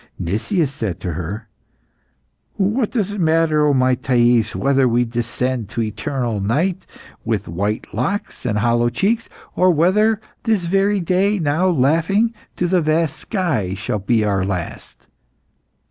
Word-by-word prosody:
Nicias 125 Hz, -, -1 dB
said 110 Hz, -, -4 dB
to 90 Hz, -, -3 dB
her 95 Hz, +7 st, -5 dB, 1.1 s
"What 210 Hz, +4 st, +1 dB
does 205 Hz, -5 st, -1 dB
it 205 Hz, -2 st, -3 dB
matter, 160 Hz, -2 st, +3 dB
O 145 Hz, -, +3 dB
my 130 Hz, 0 st, +3 dB
Thais, 120 Hz, -3 st, +2 dB
whether 135 Hz, -1 st, +2 dB
we 120 Hz, +1 st, +2 dB
descend 120 Hz, -1 st, -2 dB
to 115 Hz, +1 st, -2 dB
eternal 110 Hz, +1 st, -3 dB
night 165 Hz, -, -1 dB, 0.4 s
with 110 Hz, -3 st, -2 dB
white 100 Hz, +6 st, -2 dB
locks 160 Hz, -, -3 dB
and 110 Hz, -5 st, -1 dB
hollow 120 Hz, +2 st, +2 dB
cheeks, 210 Hz, -, 0 dB, 0.3 s
or, 185 Hz, -, +4 dB
whether 195 Hz, +7 st, +3 dB, 0.2 s
this 215 Hz, -6 st, 0 dB
very 195 Hz, +3 st, +2 dB
day, 190 Hz, +4 st, +1 dB
now 160 Hz, +2 st, +1 dB
laughing 165 Hz, -, +2 dB, 0.2 s
to 175 Hz, -, 0 dB
the 180 Hz, 0 st, +2 dB
vast 155 Hz, 0 st, +1 dB
sky, 140 Hz, -, -2 dB
shall 105 Hz, +1 st, -3 dB
be 110 Hz, +2 st, +1 dB
our 100 Hz, -2 st, +1 dB
last? 90 Hz, -3 st, -5 dB
135 Hz, 145 wpm, -20 LUFS, 110-185 Hz, 1.1 s, or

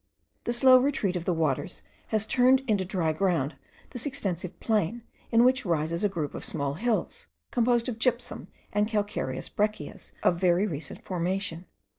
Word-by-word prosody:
The -, -, 0 dB
slow 255 Hz, +1 st, +7 dB
retreat 250 Hz, -8 st, 0 dB
of 175 Hz, -1 st, -3 dB
the -, -, +1 dB
waters 160 Hz, +1 st, -1 dB, 0.2 s
has 215 Hz, -1 st, +1 dB
turned 255 Hz, +3 st, +4 dB
into 215 Hz, -7 st, +1 dB
dry 180 Hz, -4 st, 0 dB
ground 160 Hz, -4 st, +1 dB, 0.4 s
this 245 Hz, +2 st, -4 dB
extensive 190 Hz, -, -4 dB
plain, 220 Hz, +1 st, 0 dB, 0.3 s
in 230 Hz, 0 st, +6 dB
which 255 Hz, +1 st, +4 dB
rises 170 Hz, 0 st, 0 dB
a 205 Hz, -, +3 dB
group 160 Hz, -7 st, -3 dB
of -, -, -6 dB
small 140 Hz, -1 st, -2 dB
hills, 225 Hz, +8 st, -1 dB, 0.2 s
composed 240 Hz, -1 st, +2 dB
of 230 Hz, -3 st, -4 dB
gypsum 245 Hz, 0 st, 0 dB, 0.3 s
and 210 Hz, +1 st, +2 dB
calcareous 205 Hz, -, -2 dB
breccias 210 Hz, -7 st, -3 dB
of 170 Hz, -, +3 dB
very 180 Hz, +2 st, +4 dB
recent 160 Hz, -6 st, -5 dB
formation. 180 Hz, -1 st, -2 dB
200 Hz, 160 wpm, -28 LUFS, 170-235 Hz, 0.4 s, slow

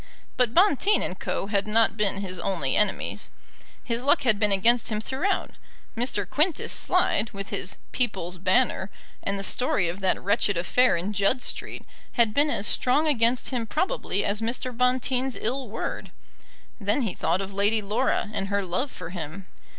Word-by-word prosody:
But 245 Hz, -2 st, +1 dB
Bonteen 395 Hz, +2 st, +4 dB
and 185 Hz, -, -4 dB
Co. -, -, -2 dB
had 200 Hz, 0 st, -1 dB
not 225 Hz, +1 st, +3 dB
been 200 Hz, -2 st, 0 dB
his 185 Hz, -2 st, -4 dB
only 170 Hz, -7 st, -1 dB
enemies. 210 Hz, -, 0 dB, 0.5 s
His 235 Hz, 0 st, -2 dB
luck 285 Hz, +2 st, +3 dB
had 220 Hz, -5 st, +2 dB
been 210 Hz, 0 st, +2 dB
against 230 Hz, +5 st, +3 dB
him 215 Hz, -2 st, -1 dB
throughout. 275 Hz, -, -1 dB, 0.4 s
Mr. 225 Hz, -5 st, -1 dB
Quintus 305 Hz, -, 0 dB
Slide, 215 Hz, +2 st, +1 dB
with 195 Hz, 0 st, -6 dB
his 185 Hz, -, -3 dB, 0.2 s
People's 185 Hz, -8 st, -2 dB
Banner, 210 Hz, -1 st, +2 dB, 0.3 s
and 200 Hz, 0 st, -2 dB
the 195 Hz, -, -4 dB
story 200 Hz, -4 st, +1 dB
of 175 Hz, +3 st, -5 dB
that 190 Hz, -2 st, +1 dB
wretched 200 Hz, 0 st, +1 dB
affair 215 Hz, +5 st, +3 dB
in 190 Hz, +5 st, -3 dB
Judd 205 Hz, +6 st, +1 dB
Street, -, -, -4 dB, 0.3 s
had 230 Hz, -3 st, +3 dB
been 290 Hz, +4 st, +3 dB
as 205 Hz, -, 0 dB
strong 275 Hz, +8 st, +2 dB
against 240 Hz, -3 st, +2 dB
him 240 Hz, -4 st, -2 dB
probably 315 Hz, -, -1 dB
as 205 Hz, +2 st, 0 dB
Mr. 240 Hz, +2 st, -2 dB
Bonteen's 255 Hz, +1 st, +1 dB
ill 255 Hz, +1 st, -1 dB
word. 220 Hz, -, -5 dB, 0.7 s
Then 210 Hz, +6 st, 0 dB
he 210 Hz, -6 st, -2 dB
thought 175 Hz, +1 st, 0 dB
of 195 Hz, 0 st, -5 dB
Lady 205 Hz, +2 st, +1 dB
Laura, 215 Hz, +1 st, 0 dB
and 195 Hz, -, -2 dB
her 200 Hz, 0 st, 0 dB
love 185 Hz, +11 st, -2 dB
for 165 Hz, -, -8 dB
him. 175 Hz, +1 st, -6 dB
215 Hz, 175 wpm, -25 LUFS, 195-255 Hz, 0.7 s, Bonteen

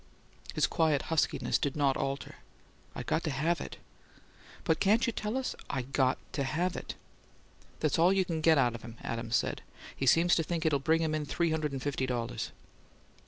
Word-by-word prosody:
His -, -, +4 dB
quiet 160 Hz, -4 st, +2 dB
huskiness 160 Hz, -, +1 dB
did 140 Hz, -, -1 dB
not 140 Hz, -3 st, +2 dB
alter. 135 Hz, +1 st, -3 dB, 0.6 s
"I -, -, -4 dB
got 160 Hz, -, 0 dB
to -, -, 0 dB
have 155 Hz, +4 st, 0 dB
it." -, -, -7 dB, 0.9 s
"But 160 Hz, -, +1 dB
can't 215 Hz, +4 st, +4 dB
you 235 Hz, -, -1 dB
tell 215 Hz, +4 st, -2 dB
us 265 Hz, -, -2 dB
" -, -, -27 dB
"I 130 Hz, -, -1 dB
got 130 Hz, 0 st, +1 dB, 0.2 s
to 140 Hz, -, 0 dB
have 170 Hz, +6 st, -1 dB
it." -, -, -6 dB, 0.9 s
"That's 155 Hz, 0 st, +1 dB
all 175 Hz, +3 st, +6 dB
you 195 Hz, -1 st, +2 dB
can 165 Hz, -2 st, -2 dB
get 160 Hz, 0 st, +5 dB
out 125 Hz, -3 st, +3 dB
of 120 Hz, -, -7 dB
him," 115 Hz, -1 st, -10 dB
Adams 115 Hz, 0 st, -2 dB
said. -, -, 0 dB, 0.3 s
"He 135 Hz, -, -2 dB
seems 170 Hz, +7 st, +5 dB
to -, -, +3 dB
think 170 Hz, +1 st, -2 dB
it'll 150 Hz, -3 st, +3 dB
bring 160 Hz, +4 st, +2 dB
him 155 Hz, -1 st, 0 dB
in 155 Hz, -1 st, -1 dB
three 170 Hz, +4 st, 0 dB
hundred 155 Hz, -2 st, 0 dB
and 135 Hz, -2 st, -4 dB
fifty 135 Hz, -2 st, -1 dB
dollars!" 120 Hz, -2 st, -2 dB
155 Hz, 205 wpm, -31 LUFS, 135-165 Hz, 0.9 s, all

